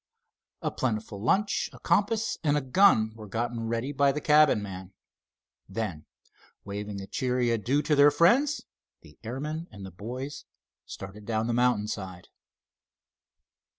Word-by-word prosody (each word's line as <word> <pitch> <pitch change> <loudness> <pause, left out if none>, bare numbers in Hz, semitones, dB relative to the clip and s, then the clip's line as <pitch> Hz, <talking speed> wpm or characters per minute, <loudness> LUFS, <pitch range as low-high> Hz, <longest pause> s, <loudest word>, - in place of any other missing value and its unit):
A - - 0
plentiful 110 -4 -3
lunch, 200 - +1
a - - -12
compass, 220 +2 +1
and 150 -1 +2
a - - 0
gun 130 - +4
were 110 -1 -10
gotten 115 +2 -3
ready 115 +4 -2
by 140 0 +3
the 145 - -3
cabin 150 -4 +5
man. 95 -1 -8 0.8
Then, 95 -7 -4 0.6
waving 100 0 -5
a - - -6
cheery 125 +1 0
adieu 120 +6 +1
to 150 - +2
their 145 +1 +7
friends, 240 - +3 0.4
the 75 - -18
airman 150 +8 -4
and 100 -3 -10
the 95 - -9
boys 125 - -7 0.4
started 100 +2 -9
down 110 -1 0
the 120 - -1
mountain 120 -3 +2
side. 95 -4 -6
120 Hz, 145 wpm, -28 LUFS, 105-145 Hz, 0.8 s, their